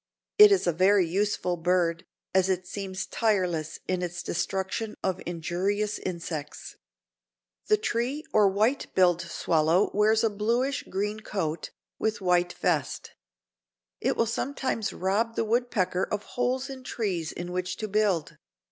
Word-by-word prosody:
It 420 0 +10
is 395 - +3
a 175 - +2
very 185 +2 +4
useful 185 -1 0
bird, 170 -1 +1 0.3
as 190 0 +3
it 185 -1 0
seems 190 0 -5
tireless 180 -8 0
in 185 -1 0
its 175 -1 -4
destruction 190 +5 -2
of 190 -1 -1
injurious 185 +5 -1
insects. 165 -4 -5 0.9
The 425 0 +4
tree 275 - -1
or 210 -2 +6
white 220 +8 +1
billed 180 -2 +4
swallow 170 +2 +1
wears 215 +2 +3
a 225 - +4
bluish 235 +6 0
green 210 +3 -2
coat, 170 -7 -3 0.3
with 220 0 0
white 180 -2 +2
vest. - - -1 0.9
It - - 0
will 230 - +3
sometimes 235 -1 -2
rob 215 +5 0
the - - 0
woodpecker 215 -6 +1
of 205 0 -2
holes 255 +2 0
in 265 -2 -8
trees 185 -10 -2
in 175 +1 -6
which 180 0 -3
to 215 - -3
build. 200 -6 0
195 Hz, 140 wpm, -27 LUFS, 180-220 Hz, 0.9 s, It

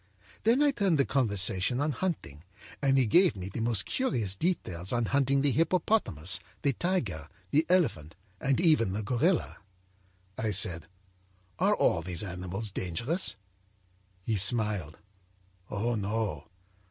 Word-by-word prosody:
âThen 240 +6 +4
I 290 - +4
turned 195 - +1
the 140 - +3
conversation 105 -2 +2
on 150 +2 0
hunting, 130 - -4 0.4
and 135 -1 +3
he 130 - +4
gave 175 - +4
me 95 -1 -6
the 100 - -6
most 115 -4 +1
curious 120 - -1
details 95 - -2
on 120 -1 0
hunting 140 +1 +1
the 145 - +3
hippopotamus, 155 - +1 0.2
the 140 -2 +2
tiger, 115 - -2 0.2
the 155 +3 +2
elephant 115 - +1 0.2
and 135 0 0
even 155 - +3
the 105 +2 -3
gorilla. 130 - 0 0.8
âI 110 -2 0
said: 85 -5 -1 0.7
â'Are - - +3
all 85 - +2
these 90 +2 -3
animals 95 +3 -5
dangerous?' 115 - -1 0.9
âHe 110 -3 +1
smiled: 100 -6 +2 0.7
â'Oh, 110 +4 -1
no! 105 +2 -3
115 Hz, 135 wpm, -29 LUFS, 95-155 Hz, 0.9 s, âThen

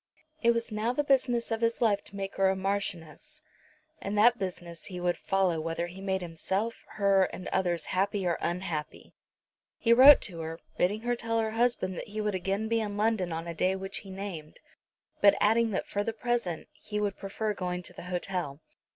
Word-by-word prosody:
It 235 - +4
was 230 -1 +1
now 215 +3 0
the 295 - 0
business 250 -4 +1
of 225 0 -1
his 230 0 +1
life 205 -4 +2
to - - -12
make 195 0 -5
her 195 0 +4
a 190 - +1
Marchioness, 195 - -3 0.6
and 205 +1 -3
that 240 +3 +5
business 175 -3 -5
he 180 -2 -6
would 175 0 +1
follow 185 -4 +1
whether 165 +1 -2
he 180 +2 -9
made 190 -1 -1
himself, 190 +7 -2
her, 195 -2 +4
and 185 - -7
others 175 -3 0
happy 195 +1 0
or 170 -1 +2
unhappy. 170 -3 -4 0.6
He 230 - +4
wrote 265 +4 +10
to 175 -4 -4
her, 165 0 -5 0.2
bidding 205 +4 +1
her 240 +1 0
tell 230 -1 -2
her 220 -1 0
husband 225 -5 0
that - - -7
he 215 +1 -6
would 210 -1 0
again 195 +4 -1
be 230 0 +1
in 205 -1 -4
London 210 -5 +1
on 165 +1 -3
a 170 - -4
day 185 +3 +1
which 190 +1 -3
he 195 - -12
named, 190 -5 -7 0.6
but 200 -1 +7
adding 225 +2 +3
that 195 - -2
for 205 - -2
the 225 - -2
present 230 -8 -2
he 210 -1 -5
would 205 -2 -1
prefer 210 +2 -3
going 180 -2 -3
to - - -8
the - - -10
hotel. 180 -5 -3
195 Hz, 205 wpm, -29 LUFS, 180-225 Hz, 0.6 s, wrote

